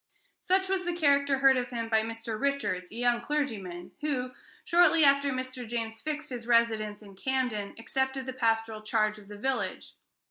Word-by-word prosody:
Such 380 +1 +2
was 380 -1 0
the 350 -1 -2
character 280 -4 +3
heard 270 -1 +5
of 250 0 -2
him 230 -2 -3
by 220 -1 +3
Mr. 225 0 -5
Richards, 275 -11 -1
a - - -10
young 240 0 +1
clergyman, 220 -11 -3
who, 260 -4 -1 0.3
shortly 335 -2 +5
after 280 0 +5
Mr. 255 -1 -5
James 225 -1 -4
fixed 305 -1 -4
his 240 -2 -6
residence 220 -3 +2
in 200 -2 -13
Camden, 245 -3 -2
accepted 265 +3 -2
the 260 - -4
pastoral 225 -3 0
charge 215 -1 0
of 200 - -16
the 205 0 -9
village. 220 -5 -2
245 Hz, 175 wpm, -29 LUFS, 220-280 Hz, 0.3 s, heard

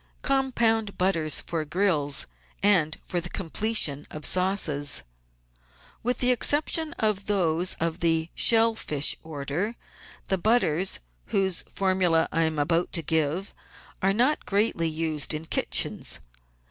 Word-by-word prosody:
Compound 235 -6 +1
Butters 165 -5 +2
for 165 -2 -3
Grills 155 -4 +1 0.4
and 170 -6 +3
for 175 - -2
the 175 - -6
Completion 175 -6 0
of 155 -1 -5
Sauces 180 -6 +1 1.0
With 245 +1 0
the 250 0 +4
exception 305 +5 +1
of 215 - -1
those 180 -3 +1
of 165 +1 -2
the 165 -1 0
shell 230 0 +4
fish 150 -9 +1
order, 160 +8 -4 0.5
the 190 - 0
butters, 190 - +1 0.3
whose 190 -3 +1
formuL 185 -3 +1
E 160 - +3
I 165 - 0
am 160 -1 -2
about 165 +4 +1
to 165 - -1
give, 160 +4 -1 0.5
are 195 0 +2
not 250 +9 +1
greatly 200 -5 +1
used 155 -1 0
in 155 +1 -6
kitchens. - - -1
180 Hz, 130 wpm, -26 LUFS, 160-210 Hz, 1.0 s, the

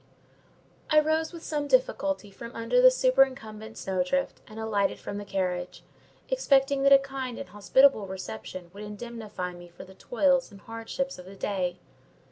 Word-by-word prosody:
I 305 - +6
rose 315 +1 +1
with 335 -2 -10
some 295 -2 -2
difficulty 295 - +1
from 230 +4 -10
under 230 - +2
the - - +10
superincumbent 255 - +1
snowdrift, 190 +9 -1
and 215 +1 -10
alighted 205 -3 0
from 200 - -5
the 205 - -7
carriage, 180 -2 -3 0.4
expecting 280 - +2
that 275 0 +4
a 275 - +11
kind 270 -3 -5
and 280 - -7
hospitable 215 +1 +4
reception 175 0 -7
would 200 - -10
indemnify 210 -3 -6
me 175 0 -12
for 175 0 -12
the 190 0 -14
toils 265 +6 +1
and 200 -1 -14
hardships 230 +4 -4
of 180 - -10
the 195 +2 -11
day. 185 -3 -2
225 Hz, 160 wpm, -28 LUFS, 195-275 Hz, 0.4 s, a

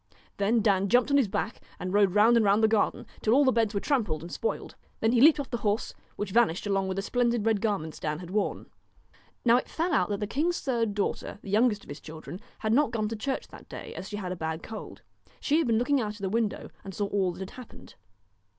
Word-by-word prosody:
Then 220 +3 +2
Dan 200 -2 +2
jumped 245 +5 +3
on 280 - +5
his 265 -6 +3
back 200 +3 -3 0.2
and 185 +1 -4
rode 200 -2 +3
round 220 +3 +6
and 230 - +4
round 205 +2 +3
the - - +7
garden, 220 -1 +1 0.2
till 220 +2 +3
all 285 +1 +5
the 260 - +5
beds 225 -3 +1
were - - +2
trampled 210 - 0
and 170 - -8
spoiled. 460 - -3 0.3
Then 225 - +2
he 240 -1 +3
leaped 305 +2 +7
off 275 - -5
the 240 - 0
horse, 210 -1 -1 0.2
which 205 -2 -4
vanished 215 -6 +2
along 195 -1 0
with 190 - -2
the 195 - -2
splendid 240 -1 +1
red 220 -3 +2
garments 195 -8 -2
Dan 150 -1 -2
had 175 +1 -9
worn. 205 0 -1 0.8
Now 235 0 +6
it - - -3
fell 335 +2 -1
out 270 - +2
that 205 -1 -2
the 210 - -1
king's 310 +11 0
third 230 -6 -1
daughter, 205 - -2
the 195 - -7
youngest 215 -1 +3
of - - -17
his 145 +1 -7
children, 160 +3 -9 0.2
had 220 0 0
not 285 +1 +4
gone 220 -3 -1
to 225 - -3
church 265 +5 -3
that - - -14
day, - - -8
as 190 - -7
she 205 - -5
had 185 -3 -4
a - - -2
bad 160 -1 -4
cold. 220 - -8 0.4
She 300 +3 +2
had 325 - +1
been 225 -1 +3
looking 255 +3 +2
out 210 -2 -3
of 210 - -13
the 195 - -1
window, 220 0 -1
and 195 -2 -8
saw 205 - -1
all 195 -2 0
that - - -11
had 190 - -6
happened. 255 -2 -12
215 Hz, 255 wpm, -28 LUFS, 195-240 Hz, 0.8 s, the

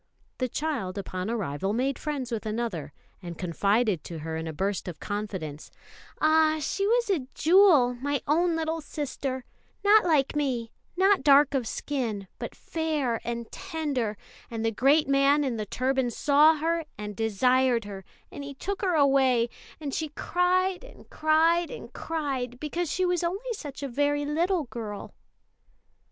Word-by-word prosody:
The 255 -1 0
child 235 -11 -3
upon 185 0 -4
arrival 195 -4 -2
made 260 +3 0
friends 280 -5 -3
with 225 -1 -3
another, 215 -10 -3 0.3
and 175 -2 -7
confided 200 +2 +1
to 170 - -6
her 160 +1 -4
in 160 0 -4
a - - -3
burst 190 +5 -2
of 175 -4 -6
confidence: 190 -8 -5 0.5
"Ah, 315 0 +4
she 395 +7 -1
was 470 -1 +2
a 290 -9 -1
jewel, 325 -7 +5
my 280 +3 -2
own 335 +3 +2
little 325 0 -2
sister 275 -3 -4 0.4
not 425 +1 +6
like 305 -5 +2
me, 255 -6 -1 0.3
not 385 +1 +4
dark 285 0 +6
of 260 -4 0
skin, 225 -10 -3
but - - -6
'fair' 305 -8 -2
and 235 -1 -4
tender; 290 - -3 0.3
and 225 -1 -3
the 225 - +2
great 275 +7 +3
man 275 +1 +4
in 255 -4 -1
the 215 -1 -4
turban 260 +1 0
saw 295 +6 +5
her 330 +2 0
and 210 -1 -6
desired 235 +2 +2
her, 195 -2 -8 0.3
and 285 - -7
he 280 0 -7
took 395 +7 -4
her 370 -4 +1
away; 265 -5 +4 0.3
and 290 -3 -5
she 315 - -1
cried 365 +5 +1
and - - -15
cried 325 +2 +3
and - - -9
cried, 270 -6 -3
because 310 +3 -2
she 370 - +1
was 355 -1 +1
only 395 +8 -2
such 290 -9 -7
a - - -1
very 290 +3 0
little 335 +4 +1
girl." 220 -5 -7
275 Hz, 160 wpm, -27 LUFS, 225-320 Hz, 0.5 s, not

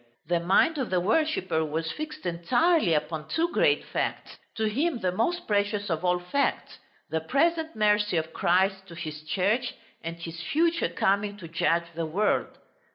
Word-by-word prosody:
The 175 -1 +1
mind 195 - +3
of 260 - -2
the 185 - +2
worshipper 190 - +1
was 160 +1 -2
fixed 310 0 -7
entirely 180 - +2
upon 155 0 -2
two 330 - 0
great - - +2
facts, - - -3 0.2
to 220 - -2
him 280 +8 0
the 185 -5 -1
most 335 - -1
precious 205 -1 0
of 160 +1 -1
all 180 0 +3
facts, 180 +11 -1 0.3
the 160 0 0
present 320 - +1
mercy 210 -3 +2
of 160 0 -2
Christ 190 +2 +1
to 170 - -11
His 155 -3 -6
Church, 205 +10 0 0.3
and 165 +1 -5
His 165 -1 -7
future 330 - +1
coming 200 +4 0
to 180 -4 -9
judge 165 +1 +1
the 165 0 -3
world. 205 +7 0
190 Hz, 165 wpm, -27 LUFS, 170-255 Hz, 0.3 s, mind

